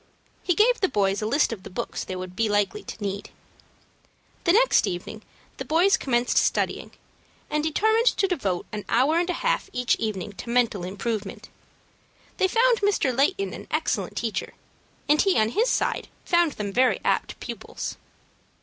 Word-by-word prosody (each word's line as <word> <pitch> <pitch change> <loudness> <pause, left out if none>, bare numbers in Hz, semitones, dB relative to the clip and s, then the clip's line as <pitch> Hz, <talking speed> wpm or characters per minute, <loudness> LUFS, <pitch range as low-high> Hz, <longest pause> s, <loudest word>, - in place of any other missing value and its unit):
He 360 - 0
gave 470 +5 +3
the 380 - +4
boys 195 -1 +1
a 215 - -1
list 280 +1 +2
of 205 - -8
the - - -10
books 185 - -4
they 185 - -6
would 185 0 -7
be 225 +1 +1
likely 205 - 0
to 210 - -8
need. 200 0 -4 1.2
The 340 - +5
next 485 +7 +4
evening 180 +5 -5 0.4
the - - -4
boys 350 +5 +3
commenced 240 -2 +1
studying, - - 0 0.6
and 300 0 0
determined 440 +9 +2
to 390 - +3
devote 205 - -2
an 210 -1 -5
hour 275 +8 +3
and 350 +1 -1
a - - +1
half - - +1
each 250 -2 +1
evening 205 -2 -3
to 235 - -7
mental 235 -6 +1
improvement. 200 +2 -4 0.9
They 380 - +3
found 465 +2 +3
Mr. 400 -11 +1
Layton 375 +9 +1
an - - -9
excellent - - -1
teacher, - - -3 0.5
and 300 +1 +4
he 390 -2 +2
on 215 0 +3
his 455 - +1
side - - 0 0.2
found 345 -4 +3
them 200 -2 -5
very 255 +2 +3
apt - - 0
pupils. - - -6
250 Hz, 170 wpm, -25 LUFS, -, 1.2 s, The